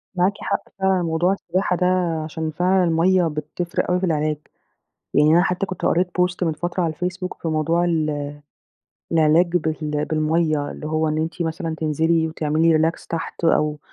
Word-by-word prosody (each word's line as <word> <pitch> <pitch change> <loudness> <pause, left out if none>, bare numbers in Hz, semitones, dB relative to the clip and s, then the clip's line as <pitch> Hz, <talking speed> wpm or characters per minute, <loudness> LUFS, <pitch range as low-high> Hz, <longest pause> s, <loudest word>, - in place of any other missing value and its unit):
معاكِ 185 +2 +2
حق - - -1 0.2
فعلًا، 190 -1 +2
موضوع 170 +3 +1
السباحة 185 -1 -1
ده 180 - 0 0.4
عشان 160 0 -4
فعلًا 185 +4 +2
المَيَّة 175 +1 +3
بتفرق 155 +3 -3
أوي 180 - +2
في 190 - 0
العلاج. 155 -2 0 0.8
يعني 150 +1 +5
أنا 175 - +5
حتّى 180 +2 0
كنت 185 - -6
قريت 180 +2 +2
post 180 0 0
من 165 -2 +2
فترة 175 +3 -2
على 165 -2 0
الفيسبوك 180 +2 -4
في 165 - -1
موضوع 160 +2 +1
ال 155 -4 -1 0.8
العلاج 165 +2 +4
بال 155 -2 -1
بالميَّة 155 -1 0
اللي - - -7
هو 155 0 0
إن 155 0 -1
أنتِ 160 +2 -2
مثلًا 165 0 -3
تنزلي 160 +1 +1
وتعملي 160 +1 +2
relax 160 +2 0
تحت، 165 +1 -5
أو 150 -2 +2
165 Hz, 170 wpm, -22 LUFS, 155-180 Hz, 0.8 s, يعني